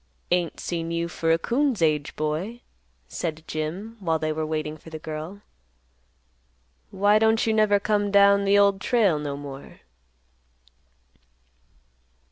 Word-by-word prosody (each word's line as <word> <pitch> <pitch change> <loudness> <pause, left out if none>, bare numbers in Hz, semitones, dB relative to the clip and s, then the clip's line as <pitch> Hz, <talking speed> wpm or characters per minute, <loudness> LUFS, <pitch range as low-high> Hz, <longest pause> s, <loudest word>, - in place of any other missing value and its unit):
"Ain't 175 -2 0
seen 165 -1 -3
you 170 0 -1
for 165 -1 -1
a 165 - +4
coon's 255 - 0
age, 150 -3 +1
boy," 160 +11 -3 0.5
said 160 - -4
Jim, 175 +10 -5
while 165 -4 0
they 155 0 -2
were 155 0 -3
waiting 155 -1 -3
for 160 - -14
the 160 - -6
girl. 155 +5 -7 1.5
"Why 205 +2 +3
don't 220 0 +3
you 220 - +1
never 215 -2 +3
come 205 0 0
down 200 0 +5
the 200 +1 +4
Old 200 -1 +3
Trail 205 -11 +2
no 145 -1 -4
more?" 140 -1 -10
170 Hz, 135 wpm, -25 LUFS, 155-205 Hz, 1.5 s, down